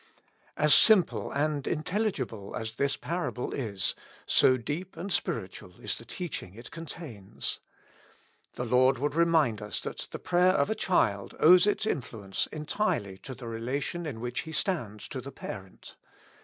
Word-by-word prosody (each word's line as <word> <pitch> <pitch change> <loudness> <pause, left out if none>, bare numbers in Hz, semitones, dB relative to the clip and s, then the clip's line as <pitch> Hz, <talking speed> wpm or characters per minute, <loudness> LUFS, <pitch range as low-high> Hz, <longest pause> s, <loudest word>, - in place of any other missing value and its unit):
As 150 0 +5
simple 175 - +5
and 145 -1 0
intelligible 155 - -2
as 110 0 -4
this 140 -1 +1
parable 170 -7 -3
is, 100 -8 -1 0.3
so 130 - +5
deep 160 +10 -5
and 180 +3 -3
spiritual 95 - -3
is - - -2
the 115 - -12
teaching 130 - -5
it 115 +2 -10
contains. 150 - -5 0.9
The 125 - -3
Lord 130 +2 +4
would 145 +3 -1
remind 160 -9 +3
us 105 -4 -3
that - - -5
the - - -5
prayer 180 +1 +3
of 200 - +2
a - - +4
child 105 - +1
owes 180 +4 +7
its 210 - +1
influence 110 - -2
entirely 150 - -2
to 130 - -8
the 120 -1 -8
relation 135 +9 -3
in 125 -7 -5
which 120 +1 -3
he 160 - -5
stands 120 - -2
to 130 - -4
the 140 +2 -8
parent. 95 -7 -9
135 Hz, 155 wpm, -29 LUFS, 110-170 Hz, 0.9 s, owes